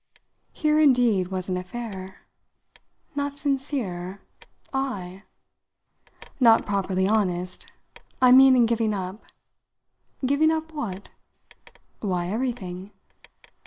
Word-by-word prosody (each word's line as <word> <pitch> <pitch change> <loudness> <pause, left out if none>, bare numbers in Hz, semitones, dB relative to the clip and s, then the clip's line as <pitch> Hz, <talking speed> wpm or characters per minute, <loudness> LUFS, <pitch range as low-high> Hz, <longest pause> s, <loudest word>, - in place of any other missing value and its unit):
Here 305 -1 +1
indeed 245 -10 +4
was 185 -1 -4
an 185 -1 -1
affair. 190 -1 -7 0.9
"Not 285 0 -3
sincere 255 -11 -3 0.5
I?" 195 -9 -3 1.2
"Not 230 -3 +5
properly 190 -2 0
honest. 185 -4 -1 0.5
I 255 -1 +6
mean 265 0 +8
in 245 -2 +5
giving 225 -2 0
up." 190 +2 -6 1.0
"Giving 285 +4 +3
up 320 0 -3
what?" 205 -10 -6 0.9
"Why, 180 -4 -2
everything." 205 -5 -4
220 Hz, 90 wpm, -25 LUFS, 185-265 Hz, 1.2 s, mean